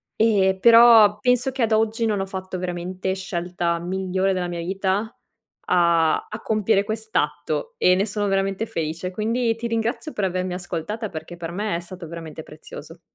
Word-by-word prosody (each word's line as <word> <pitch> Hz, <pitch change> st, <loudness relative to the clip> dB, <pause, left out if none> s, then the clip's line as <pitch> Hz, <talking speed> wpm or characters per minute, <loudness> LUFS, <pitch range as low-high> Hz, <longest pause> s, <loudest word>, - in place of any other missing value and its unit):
Ehm, 195 Hz, -4 st, +3 dB
però 230 Hz, -2 st, +7 dB
penso 250 Hz, +3 st, +2 dB
che 260 Hz, -2 st, -1 dB
ad 225 Hz, -, 0 dB
oggi 220 Hz, +1 st, +1 dB
non 210 Hz, -3 st, 0 dB
ho 195 Hz, -, -1 dB
fatto 190 Hz, -1 st, -6 dB
veramente 180 Hz, +1 st, -3 dB
scelta 175 Hz, -2 st, -2 dB
migliore 190 Hz, +2 st, -1 dB
nella 180 Hz, -1 st, -2 dB
mia 175 Hz, -1 st, -5 dB
vita 190 Hz, +4 st, -1 dB, 0.6 s
a 170 Hz, -3 st, +3 dB
a 215 Hz, -, -7 dB
compiere 215 Hz, -2 st, +2 dB
quest'atto 155 Hz, -9 st, -2 dB
e 180 Hz, -, +5 dB
ne 195 Hz, +3 st, +1 dB
sono 205 Hz, 0 st, -2 dB
veramente 195 Hz, +2 st, 0 dB
felice 165 Hz, +1 st, -4 dB
quindi 230 Hz, +4 st, 0 dB
ti 230 Hz, +1 st, -5 dB
ringrazio 230 Hz, +7 st, -2 dB
per 205 Hz, -, -2 dB
avermi 185 Hz, -1 st, -2 dB
ascoltata 180 Hz, +5 st, -4 dB
perché 160 Hz, +2 st, -8 dB
per 170 Hz, -1 st, -6 dB
me 205 Hz, 0 st, -2 dB
è -, -, -3 dB
stato 175 Hz, -1 st, -10 dB
veramente 160 Hz, -1 st, -8 dB
prezioso. 155 Hz, +2 st, -12 dB
190 Hz, 170 wpm, -23 LUFS, 175-220 Hz, 0.6 s, però